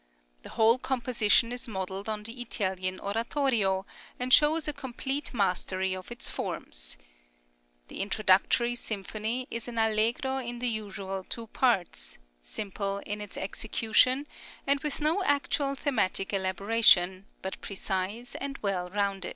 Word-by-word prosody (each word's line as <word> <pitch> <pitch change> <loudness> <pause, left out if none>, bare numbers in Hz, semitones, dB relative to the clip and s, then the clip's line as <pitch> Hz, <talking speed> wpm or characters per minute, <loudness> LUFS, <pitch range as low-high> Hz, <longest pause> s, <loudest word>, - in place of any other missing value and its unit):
The - - -11
whole 230 +3 +4
composition 240 -3 +2
is 245 +1 -3
modelled 190 0 -4
on 210 -1 -2
the 230 +3 -6
Italian 185 -5 -1
oratorio, 220 -3 +1 0.3
and 255 +1 +1
shows 310 +1 +5
a 300 - -1
complete 275 +1 -4
mastery 190 -3 0
of 185 +4 -9
its 240 - -3
forms. - - -4 0.9
The - - -4
introductory 205 +4 +3
symphony 220 +2 -3
is 230 +1 -3
an 240 -1 -6
allegro 225 +4 +2
in 240 -1 -4
the 245 0 0
usual 200 -3 -4
two 230 - -2
parts, 185 - 0 0.2
simple 195 - -3
in 210 0 -3
its 205 - -8
execution, 225 +7 +2 0.4
and 280 0 +3
with 300 0 -3
no 320 +6 +2
actual 285 -2 +1
thematic 215 -9 0
elaboration, 190 -1 +3 0.2
but 190 0 -5
precise 200 +4 -3
and 275 0 -4
well 185 -3 -1
rounded. 200 -1 -1
220 Hz, 135 wpm, -29 LUFS, 190-250 Hz, 0.9 s, shows